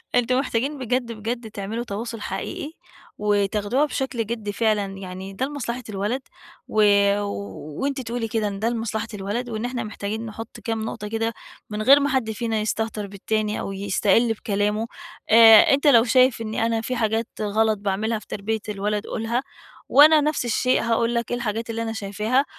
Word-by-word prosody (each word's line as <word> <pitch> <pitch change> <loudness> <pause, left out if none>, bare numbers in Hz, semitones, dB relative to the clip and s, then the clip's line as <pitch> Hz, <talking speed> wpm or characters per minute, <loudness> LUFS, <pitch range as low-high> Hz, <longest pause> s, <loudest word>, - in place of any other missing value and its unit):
أنتم 250 +1 +3
محتاجين 270 +2 -1
بجد 250 -2 -1
بجد 225 +1 -5
تعملوا 210 +4 -4
تواصُل 230 +1 -5
حقيقي، 195 +10 -4 0.5
وتاخدوها 210 +5 +1
بشكل 265 -5 -2
جدّي 215 -2 -4
فعلًا، 215 -1 +1
يعني 190 0 -7
ده 255 +7 -1
لمصلحة 255 -3 -4
الولد 210 +6 -2 0.5
و 215 - +1 1.0
وأنتِ 275 -1 -1
تقولي 235 -1 -3
كده 220 -1 -1
إن 200 -1 -5
ده 225 +3 +1
لمصلحة 225 -1 -2
الولد، 210 +5 -3
وإن 220 0 -3
احنا 245 -1 -3
محتاجين 215 +1 -4
نحُط 225 0 -8
كام 225 -1 -2
نُقطة 210 -1 -5
كده 225 +1 -1 0.4
من 210 0 -3
غير 275 +6 +7
ما 285 0 +1
حد 260 -5 0
فينا 225 0 -2
يستهتر 215 -1 -2
بالتاني 210 +2 -2
أو - - -4
يستقِل 200 +4 +2
بكلامه. 210 +1 -1 0.4
آآ، 225 +1 +8
أنت 280 +2 +2
لو 235 -5 +7
شايف 255 0 +3
إني 220 0 -1
أنا 230 -1 0
في 255 +3 -3
حاجات 225 0 0
غلط 215 +1 +2
باعملها 210 +3 -1
في 210 - -18
تربية 220 +2 -2
الولد 210 +1 -2
قُلها، 235 +3 -2 0.5
وأنا 305 +2 +7
نفس 300 -3 0
الشيء 250 +2 +2
هاقول 230 +1 +1
لك 235 -2 -2
إيه 245 - 0
الحاجات 230 -1 -3
اللي 230 0 -3
أنا 225 -1 -3
شايفاها، 215 +6 0
225 Hz, 170 wpm, -23 LUFS, 210-240 Hz, 1.0 s, آآ